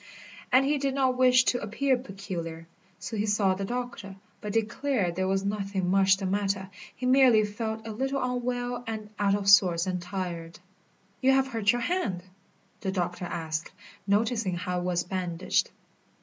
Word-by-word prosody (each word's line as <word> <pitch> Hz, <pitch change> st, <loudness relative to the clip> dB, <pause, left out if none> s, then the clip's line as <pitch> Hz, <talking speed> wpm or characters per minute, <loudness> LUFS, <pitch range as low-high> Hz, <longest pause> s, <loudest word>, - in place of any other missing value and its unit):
And 260 Hz, +1 st, +5 dB
he 290 Hz, +1 st, +1 dB
did 270 Hz, -1 st, -1 dB
not 260 Hz, -2 st, +2 dB
wish 255 Hz, 0 st, +5 dB
to 245 Hz, -, +1 dB
appear 260 Hz, +6 st, +1 dB
peculiar. 180 Hz, -8 st, -6 dB, 0.3 s
So 185 Hz, +3 st, -6 dB
he 210 Hz, +1 st, 0 dB
saw 205 Hz, -2 st, +3 dB
the 195 Hz, +1 st, -3 dB
doctor, 240 Hz, -4 st, -5 dB, 0.3 s
but 210 Hz, -, -4 dB
declared 225 Hz, -3 st, 0 dB
there 185 Hz, +1 st, 0 dB
was 195 Hz, +1 st, 0 dB
nothing 195 Hz, -3 st, -1 dB
much 195 Hz, 0 st, +4 dB
the 195 Hz, -, -4 dB
matter, 195 Hz, 0 st, -1 dB, 0.2 s
he 255 Hz, -, -5 dB
merely 250 Hz, -4 st, +5 dB
felt 220 Hz, +1 st, -4 dB
a 225 Hz, -, -5 dB
little 270 Hz, +5 st, -1 dB
unwell 245 Hz, -1 st, -2 dB
and 215 Hz, -2 st, -5 dB
out 200 Hz, -1 st, +3 dB
of 200 Hz, -1 st, -3 dB
sorts 185 Hz, -4 st, +6 dB
and 180 Hz, -1 st, -2 dB
tired. 175 Hz, -2 st, -5 dB, 0.6 s
"You 265 Hz, +1 st, +5 dB
have 270 Hz, 0 st, +2 dB
hurt 220 Hz, -5 st, +2 dB
your 245 Hz, -, -2 dB
hand?" 230 Hz, -, -1 dB, 0.6 s
the 190 Hz, -, -2 dB
doctor 180 Hz, -1 st, -2 dB
asked, 160 Hz, -2 st, -4 dB, 0.4 s
noticing 215 Hz, -1 st, +1 dB
how 180 Hz, 0 st, -2 dB
it -, -, -4 dB
was 175 Hz, -1 st, 0 dB
bandaged. 180 Hz, -1 st, -1 dB
205 Hz, 170 wpm, -28 LUFS, 185-245 Hz, 0.6 s, sorts